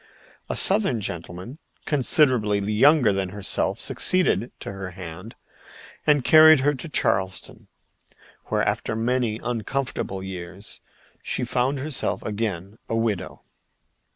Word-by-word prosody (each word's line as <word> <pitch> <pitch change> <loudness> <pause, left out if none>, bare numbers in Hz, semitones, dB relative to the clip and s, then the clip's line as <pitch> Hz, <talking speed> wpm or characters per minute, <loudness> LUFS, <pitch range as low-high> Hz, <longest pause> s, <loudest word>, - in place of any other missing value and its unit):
A - - -2
Southern 195 - +4
gentleman 90 - -7 0.3
considerably 130 -7 +2
younger 110 +4 +3
than 95 -1 -2
herself 100 +1 -2
succeeded 175 - +1
to - - -6
her 95 -1 -7
hand 90 +5 -9 0.7
and 145 -4 +3
carried 155 -2 +7
her 145 +2 +2
to 145 +4 -8
Charleston, 95 -9 -1 0.8
where - - -1
after 110 - -2
many 115 -1 -1
uncomfortable 120 -4 -3
years 95 +1 -7 0.4
she - - -2
found 130 +3 0
herself 140 0 -1
again 105 -2 -4
a 115 - -1
widow. 110 -5 -3
115 Hz, 115 wpm, -23 LUFS, 95-135 Hz, 0.8 s, carried